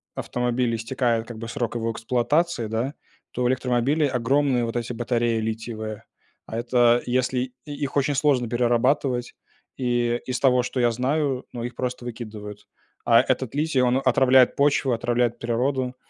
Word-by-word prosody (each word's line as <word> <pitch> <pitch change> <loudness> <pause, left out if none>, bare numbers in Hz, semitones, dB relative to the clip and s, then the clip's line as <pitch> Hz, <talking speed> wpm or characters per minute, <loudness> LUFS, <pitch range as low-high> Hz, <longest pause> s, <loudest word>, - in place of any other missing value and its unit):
автомобиле 125 -1 -1
истекает, 115 0 -1
как 120 -2 -8
бы, 115 - -6
срок 120 0 -3
его 115 -1 -1
эксплуатации, 125 +3 0
да, 115 +6 -2 0.4
то 125 - -2
в - - +3
электромобиле 130 +4 +1
огромные 130 0 +1
вот 115 - -5
эти 120 0 -2
батареи 120 -1 0
литиевые. 110 -1 -5 0.4
А 110 - -6
это, 120 0 +3
если 125 0 -1
и 145 - -7
их 140 -1 -4
очень 140 0 +1
сложно 130 -5 +2
перерабатывать, 125 +1 +1 0.4
и, 120 -2 0
из 130 0 -3
того, 125 -2 +4
что 125 +1 -2
я 120 - +3
знаю, 135 +2 -1
ну, 120 - -5
их 120 +1 -4
просто 125 0 -4
выкидывают. 110 -3 -8 0.4
А 115 0 +6
этот 130 0 -2
литий, 150 -2 +1
он 125 +2 +2
отравляет 130 0 +4
почву, 140 -1 +2
отравляет 120 0 0
природу, 125 +2 -1
125 Hz, 155 wpm, -24 LUFS, 115-130 Hz, 0.4 s, А